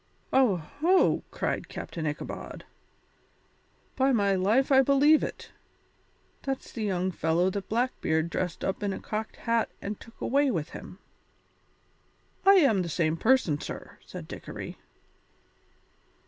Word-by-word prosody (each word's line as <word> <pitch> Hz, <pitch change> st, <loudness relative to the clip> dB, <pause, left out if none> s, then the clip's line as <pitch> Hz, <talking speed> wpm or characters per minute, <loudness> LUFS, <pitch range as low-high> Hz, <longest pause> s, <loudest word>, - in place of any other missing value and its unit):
"Oho!" 265 Hz, -, +3 dB
cried -, -, -3 dB
Captain 160 Hz, -2 st, -5 dB
Ichabod, 150 Hz, 0 st, -6 dB, 1.3 s
"by 270 Hz, +1 st, +3 dB
my 200 Hz, -5 st, +3 dB
life 215 Hz, +9 st, +2 dB
I 265 Hz, 0 st, +7 dB
believe 280 Hz, +3 st, +5 dB
it. -, -, -6 dB, 0.9 s
That's 270 Hz, -1 st, -4 dB
the 225 Hz, -, -4 dB
young 185 Hz, -2 st, 0 dB
fellow 170 Hz, +2 st, +1 dB
that 200 Hz, 0 st, -5 dB
Blackbeard 190 Hz, -9 st, 0 dB
dressed 180 Hz, -2 st, -3 dB
up 190 Hz, -, -2 dB
in 200 Hz, -1 st, -1 dB
a -, -, -5 dB
cocked 215 Hz, +1 st, -4 dB
hat 230 Hz, -1 st, 0 dB
and 205 Hz, +1 st, -5 dB
took 230 Hz, -, -15 dB
away 280 Hz, +2 st, +2 dB
with 165 Hz, -, -2 dB
him." 180 Hz, -, -10 dB, 1.5 s
"I 395 Hz, -, +9 dB
am 270 Hz, -, +5 dB
the 170 Hz, -, -3 dB
same 160 Hz, -1 st, +1 dB
person, 185 Hz, -, +2 dB
sir," -, -, -8 dB
said -, -, -9 dB
Dickory. -, -, -8 dB
210 Hz, 130 wpm, -28 LUFS, 180-265 Hz, 1.5 s, I